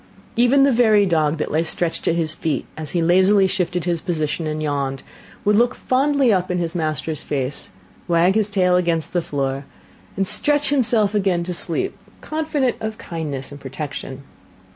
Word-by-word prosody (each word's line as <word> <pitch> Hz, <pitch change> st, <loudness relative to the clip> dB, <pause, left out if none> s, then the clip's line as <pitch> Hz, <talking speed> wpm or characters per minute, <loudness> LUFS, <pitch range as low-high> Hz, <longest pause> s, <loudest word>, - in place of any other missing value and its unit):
Even 245 Hz, +4 st, +4 dB
the 275 Hz, -, +4 dB
very 220 Hz, -4 st, +4 dB
dog 160 Hz, -3 st, +1 dB
that 150 Hz, -, -3 dB
lay 155 Hz, -, +2 dB
stretched 165 Hz, 0 st, -1 dB
at 165 Hz, -, +2 dB
his 160 Hz, -2 st, -1 dB
feet, 155 Hz, -1 st, -2 dB
as 155 Hz, -2 st, -6 dB
he 170 Hz, +1 st, 0 dB
lazily 190 Hz, +3 st, +4 dB
shifted 180 Hz, -2 st, -1 dB
his 170 Hz, -2 st, -1 dB
position 160 Hz, -3 st, -2 dB
and 155 Hz, 0 st, -3 dB
yawned, 140 Hz, -2 st, -2 dB, 0.4 s
would 210 Hz, 0 st, +4 dB
look 240 Hz, +3 st, +3 dB
fondly 270 Hz, -2 st, +2 dB
up 185 Hz, -1 st, 0 dB
in 180 Hz, -, 0 dB
his 170 Hz, -1 st, -2 dB
master's 155 Hz, -2 st, -2 dB
face, 140 Hz, -1 st, -3 dB, 0.4 s
wag 175 Hz, +2 st, +3 dB
his 215 Hz, -1 st, +2 dB
tail 185 Hz, -3 st, +2 dB
against 170 Hz, -3 st, 0 dB
the 175 Hz, -, +1 dB
floor, 135 Hz, -3 st, -3 dB, 0.5 s
and 195 Hz, -, +1 dB
stretch 290 Hz, +8 st, +1 dB
himself 225 Hz, -6 st, +3 dB
again 190 Hz, -4 st, +1 dB
to 180 Hz, +1 st, -4 dB
sleep, 170 Hz, -2 st, -1 dB, 0.2 s
confident 305 Hz, -5 st, -1 dB
of 220 Hz, 0 st, -4 dB
kindness 145 Hz, -6 st, -5 dB
and 140 Hz, 0 st, -10 dB
protection. 135 Hz, -1 st, -6 dB
175 Hz, 175 wpm, -21 LUFS, 155-210 Hz, 0.5 s, Even